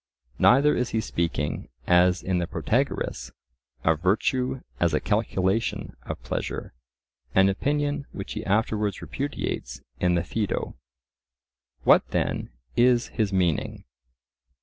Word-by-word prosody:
Neither 140 +4 +5
is 125 0 0
he 110 - 0
speaking, 85 -7 -2 0.2
as 90 0 +4
in 90 -1 0
the 85 - -1
Protagoras, - - -1 0.5
of 80 -1 +2
virtue 125 +7 +1 0.2
as 85 -3 +2
a - - +2
calculation 105 0 0
of - - -4
pleasure, - - -4 0.6
an 95 +1 +6
opinion 145 +6 -1
which 95 - -6
he 110 - -4
afterwards 105 -1 0
repudiates 145 +1 -4 0.2
in 90 -1 +2
the 85 - +1
Phaedo. 105 +3 -2 1.1
What - - +5
then - - -1 0.3
is 120 0 +4
his 110 -4 -1
meaning? 90 -5 0
105 Hz, 120 wpm, -26 LUFS, 90-120 Hz, 1.1 s, an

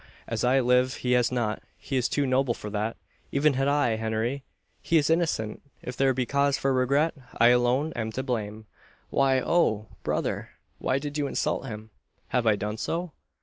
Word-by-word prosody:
As 115 -2 -2
I 130 +2 +4
live 125 +1 +3
he 125 - +2
has 125 -1 +3
not. 115 -4 -1 0.2
He 135 - -5
is 125 -2 +1
too 145 - +1
noble 130 -2 +1
for 105 - -7
that 110 +2 -2 0.3
even 145 +1 +3
had 135 +1 0
I 140 -6 +2
Henry! 110 +5 -2 0.4
he 165 - +2
is 150 0 +2
innocent! 160 -11 0 0.2
If 125 - -5
there 135 0 +3
be 130 -1 -1
cause 140 +2 +2
for 135 0 +1
regret, 140 +5 +2 0.2
I 120 - +6
alone 125 +5 +2
am 110 -1 -2
to 130 - -3
blame. 110 -4 -3 0.5
Why 135 -1 +3
oh! 110 -9 +1
brother! - - -2 0.3
why 130 - +1
did 145 +1 -4
you 145 - 0
insult 135 - -1
him?" 110 -1 -8 0.4
"Have 125 -2 +1
I 110 - +5
done 105 +2 -4
so?" 170 +7 -3
125 Hz, 190 wpm, -27 LUFS, 115-140 Hz, 0.5 s, I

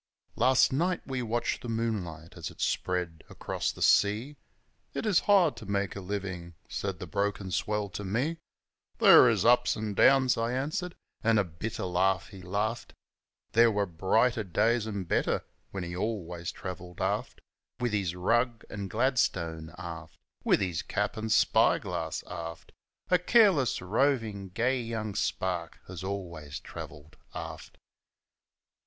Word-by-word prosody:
Last 130 +2 +4
night 175 +6 +1
we 130 -2 -3
watched 120 0 -1
the 120 - -6
moonlight 95 -8 -3
as 85 -4 -5
it - - -16
spread 90 -3 -1
across - - -3
the - - -4
sea 110 +8 +3 0.6
"It - - -2
is 205 -4 +4
hard 180 -9 +5
to 110 - -9
make 100 -1 -1
a - - -4
livin'," 95 -3 -5
said 100 -2 -3
the - - -6
broken 100 +2 -2
swell 105 +2 -1
to 105 - -6
me, 125 - -1 0.6
"There - - +8
is - - +1
ups 120 +1 +4
and 105 -2 -4
downs," 135 +1 +5
I 115 +2 0
answered, 155 +7 -2 0.3
an' 115 -1 +4
a 105 - +4
bitter 95 +4 -5
laugh 90 0 +1
he 95 - -11
laughed 105 +5 -3 0.6
There 115 +1 +6
were 105 -2 +1
brighter 110 +7 +1
days 110 +5 +1
an' 100 -3 -3
better 85 - 0 0.2
when 95 -2 -5
he 85 0 -5
always 90 -5 -3
travelled 90 -1 -8
aft - - -2 0.4
With 120 -3 -1
his 95 -4 0
rug 115 +6 +1
an' 100 -2 -4
gladstone, 90 - 0
aft, 85 -2 -8 0.3
With - - +3
his 90 -4 -1
cap - - -2
an' 110 0 -4
spyglass, - - +2
aft 85 -2 -7 0.4
A 180 - +5
careless, 180 - +4
rovin', 110 -2 0
gay 120 +6 0
young 110 -3 -4
spark 90 -3 -2
as 90 -1 -7
always 85 -7 -5
travelled 75 0 -10 0.2
aft. - - -7
100 Hz, 150 wpm, -29 LUFS, 90-120 Hz, 0.6 s, There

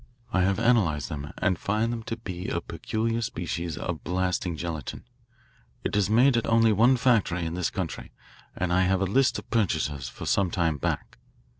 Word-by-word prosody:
I 95 - +3
have 95 +1 +2
analysed 105 - +2
them, 75 -2 -5
and 95 -5 +1
find 110 +3 0
them 115 - -4
to 115 - -4
be 90 -5 -6
a - - -1
peculiar 115 +1 -2
species 85 -7 -3
of - - -4
blasting 90 -1 -1
gelatine. 80 -2 -5 0.8
It - - -2
is 105 -1 +2
made 125 +4 +5
at 115 - 0
only 115 -1 +4
one 120 +5 +5
factory 105 -9 +2
in 80 - -3
this 90 0 0
country, - - -5 0.5
and 90 -1 0
I 90 - +4
have 95 +1 +2
a - - +2
list 130 +8 +2
of - - -8
purchasers 80 - 0
for - - -8
some 100 -2 +2
time 85 -4 0
back. - - -3
95 Hz, 185 wpm, -27 LUFS, 85-115 Hz, 0.8 s, made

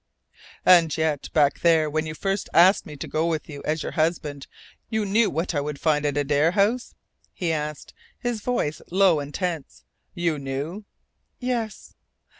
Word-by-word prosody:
"And 170 -3 +6
yet, 155 -3 -1
back 145 -2 +3
there 165 -2 +4
when 155 +1 -1
you 155 - -5
first 195 +3 -2
asked 185 +4 +6
me 150 - -8
to - - -6
go 160 +2 0
with 160 -3 -2
you 145 -2 -8
as 155 0 -1
your - - -4
husband, 155 -3 -1 0.4
you 220 -1 0
knew 210 +3 +3
what 165 +2 -2
I 145 - 0
would 145 0 -5
find 150 -2 +2
at 145 0 -1
Adare 145 +3 +2
House?" 215 +5 +1 0.4
he 175 -3 -2
asked, 150 -2 -4 0.2
his 240 -3 -3
voice 155 - -1
low 185 -3 +4
and 145 0 -6
tense. 170 -4 -4 0.3
"You 170 -4 0
knew?" 140 +9 -5 0.5
"Yes." 240 -4 -3
160 Hz, 170 wpm, -24 LUFS, 150-195 Hz, 0.5 s, And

